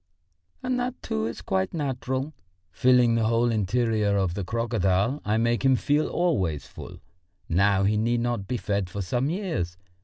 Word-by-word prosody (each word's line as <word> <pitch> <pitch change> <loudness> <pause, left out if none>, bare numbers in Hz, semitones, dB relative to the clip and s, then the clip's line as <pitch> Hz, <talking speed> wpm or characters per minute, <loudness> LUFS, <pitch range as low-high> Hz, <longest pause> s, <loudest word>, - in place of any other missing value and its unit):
And 255 -1 0
that, 245 +1 -3
too, 110 0 -1
is 115 - -7
quite 95 - -1
natural; 135 0 -2 0.4
filling 125 -2 +4
the 115 -1 +1
whole 115 +1 +2
interior 110 -1 +1
of 95 -3 0
the 100 +2 -3
crocodile 110 +3 0
I 105 +1 +1
make 115 +2 +1
him 135 -1 +5
feel 145 +4 +1
always 95 - 0
full. - - -10 0.5
Now 95 +3 +3
he 105 +2 +2
need 120 +2 +1
not 120 -5 -2
be 125 - -1
fed 100 -4 -2
for 100 +2 -4
some 125 +8 -1
years. 160 - -3
115 Hz, 165 wpm, -26 LUFS, 100-130 Hz, 0.5 s, him